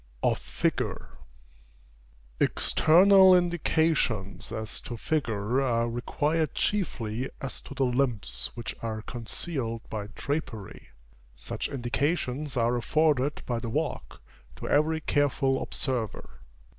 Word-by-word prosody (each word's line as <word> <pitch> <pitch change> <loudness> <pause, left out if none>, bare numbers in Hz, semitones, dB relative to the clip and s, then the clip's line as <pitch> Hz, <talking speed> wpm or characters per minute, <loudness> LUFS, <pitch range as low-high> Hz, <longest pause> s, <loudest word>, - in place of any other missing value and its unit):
OF - - +2
FIGURE. - - -2 1.3
External 190 +3 +6
indications 155 - +1
as 110 -1 -4
to 120 - -6
figure 120 -4 0
are 120 -3 +1
required 150 +7 -1
chiefly 130 - -1
as 135 - -5
to 140 - -10
the 135 0 +2
limbs 120 - 0
which 120 - -4
are 110 -1 -4
concealed 120 0 -4
by 105 -2 -4
drapery. 140 -9 -4 0.5
Such - - -4
indications 140 +1 -1
are 120 +1 +2
afforded 145 +2 +1
by 120 -2 -1
the 115 - -5
walk, - - -3 0.3
to - - -7
every 160 +2 +2
careful 140 -2 +1
observer. 125 -6 -3
130 Hz, 105 wpm, -28 LUFS, 115-155 Hz, 1.3 s, External